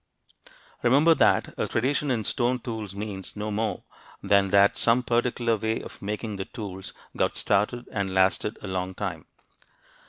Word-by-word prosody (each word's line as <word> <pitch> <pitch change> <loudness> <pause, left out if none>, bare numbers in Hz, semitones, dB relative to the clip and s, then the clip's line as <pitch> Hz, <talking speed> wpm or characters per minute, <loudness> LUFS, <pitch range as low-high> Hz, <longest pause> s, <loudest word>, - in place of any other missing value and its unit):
Remember 140 +7 +5
that - - +3
a - - 0
tradition 140 +5 0
in 120 -4 0
stone 125 -1 +1
tools 110 -5 -6
means 100 -2 -6
no 105 +1 -3
more 110 +2 -2 0.4
than 100 -1 +3
that 100 +1 +5
some 120 +2 +3
particular 120 -1 +1
way 110 +1 -1
of - - -10
making 105 +1 -4
the 95 - -4
tools 95 -5 -7 0.2
got - - 0
started 105 +4 0
and 100 -3 -2
lasted 95 +3 +1
a - - -5
long 95 0 -3
time. - - -5
110 Hz, 155 wpm, -26 LUFS, 100-120 Hz, 0.4 s, Remember